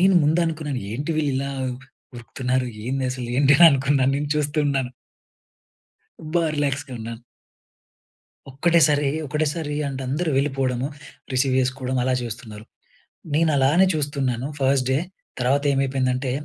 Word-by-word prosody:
నేను, 190 +1 +5
ముందు 160 +4 +3
అనుకున్నాను, 150 -5 -3
ఏంటి 145 +7 -3
వీళ్ళు 145 -3 +1
ఇలా 140 +1 -2 0.7
ఉరుకుతున్నారు! 125 +1 -2 0.2
ఏంది 130 +2 -2
అసలు, 125 -2 -5
ఏంటా 140 0 +5
అని 170 - +10
అనుకున్నాను. 135 0 +2
నేను 145 0 -3
చూస్తున్నాను. 145 -3 0 1.4
బా 170 - +3
రిలాక్స్‌గా 140 -2 -2
ఉన్నాను. 115 +1 -7 1.3
ఒక్కటేసారి, 150 0 +3 0.2
ఒకటేసారి 150 +1 -2
అంటే 135 -1 -5
అందరూ 155 +5 -1
వెళ్ళిపోవడము, 135 -2 -1 0.4
రిసీవ్ 130 0 +1
చేసుకోవడం, 130 0 -2
అలా 130 +1 +1
చేస్తున్నారు. 110 -2 -8 0.7
నేను 160 +1 +3
అలానే 145 +8 +4
చూస్తున్నాను 135 -4 -1
ఫస్ట్ 135 -1 +2
డే. 135 - +2 0.4
తర్వాత 135 +3 +2
ఏమైపోయిందంటే, 130 -1 0
135 Hz, 120 wpm, -23 LUFS, 130-145 Hz, 1.4 s, అని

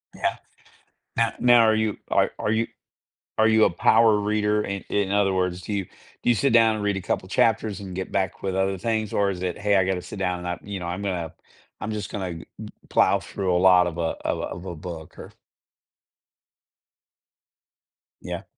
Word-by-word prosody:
Yeah. - - -1 0.8
No 115 -1 +3
now 120 -1 +6
are 110 -1 +4
you 110 -2 0
are - - +2
are 105 - 0
you 115 +1 +1 0.7
are 110 +1 +5
you 110 -1 +5
a - - +3
power 110 +5 +4
reader? 105 0 +1
I 100 0 -4
in 100 -1 0
other 100 -1 +3
words, 90 -1 -1
do 105 - -5
you 100 -2 -1
do 120 - -5
you - - +5
sit 135 +4 +1
down 115 -1 +5
and 105 - -4
read 100 -1 +1
a 95 - -4
couple 95 +1 -2
chapters 110 -2 +1
and 95 -2 -7
get 95 0 -4
back 95 -3 -1
with 95 -1 -2
other 95 0 0
things? 110 -1 -1
Or 100 -1 +2
is 90 -1 -5
it, 90 -2 -2
"Hey, 100 -1 +2
I 95 - +4
gotta 95 -1 -1
sit 90 +2 -9
down 90 -2 -1
and 90 - -5
I" 90 - -3
you 100 -2 -6
know, 85 - -5
"I'm 90 +3 -4
gonna 90 -5 -3 0.5
I'm 110 - -3
just 105 -2 -4
gonna 95 -4 -4
g 80 - -10 0.2
g - - -8 0.2
plow - - +3
through 95 -2 -2
a - - +3
lot 90 -1 +6
of 85 -1 -4
a - - -1 0.3
of - - 0
a - - -4
of 90 +2 -6
a 85 - -5
book," 80 -1 -9
or - - -10 2.9
Yeah. - - -5
100 Hz, 215 wpm, -24 LUFS, 90-105 Hz, 2.9 s, now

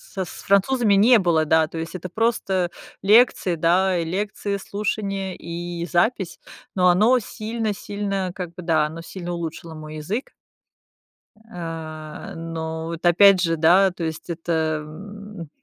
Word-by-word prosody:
с 190 -3 -5
французами 205 +2 +3
не 230 +5 +6
было, 170 -4 +2
да, 160 +1 +3
то 165 - -8
есть 165 +2 -5
это 185 0 -6
просто 190 -4 0 0.3
лекции, 205 -3 +4
да, 180 +3 +2
лекции, 200 +3 -2
слушание 195 -1 -3
и 170 0 -5
запись, 190 +1 0 0.4
но 180 -1 +4
оно 215 +8 +5
сильно 220 0 -3
сильно 200 -2 -3
как 180 -2 -5
бы, 180 - -8
да, 160 -3 +2
оно 160 +2 -8
сильно 175 +1 -7
улучшило 165 -1 -6
мой 155 0 -8
язык. 200 - -4 1.2
А, 160 -3 -7
но 160 -1 -5
вот, 165 +1 -6
опять 190 +2 +6
же, 165 -2 +1
да, 180 +5 +5
то 175 -1 -7
есть 160 +1 -5
это, 160 -2 -1
м, 200 +2 -10
180 Hz, 140 wpm, -23 LUFS, 165-200 Hz, 1.2 s, не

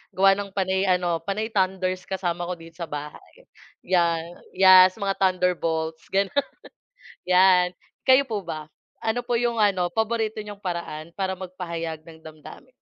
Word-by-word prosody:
gawa 195 +1 +6
ng 200 +1 -1
panay 190 0 0
ano 175 -2 +1
panay 215 +5 -3
tanders 185 -2 -1
kasama 175 -2 -2
ko 180 - -3
dito 165 +1 -15
sa 170 - -4
bahay. 150 - -9 0.4
Yeah, 170 -3 +2 0.3
yes, 185 -1 +7
mga 200 -2 -2
thunder 180 -2 +2
bolts 160 -1 -3
gano'n 195 0 0 1.0
yan. 180 -1 +4 0.3
Kayo 260 +1 +6
po 210 -8 -5
ba? 155 -2 -6 0.3
Ano 240 +2 -1
po 245 - 0
yung 235 -1 0
ano 185 -4 +2
paborito 220 +1 -1
niyong 205 -1 -8
paraan 170 -3 -5
para 190 -1 -1
mag-pahayag 170 -4 -6
ng 160 -1 -14
damdamin? 155 - -13
185 Hz, 150 wpm, -24 LUFS, 170-200 Hz, 1.0 s, yes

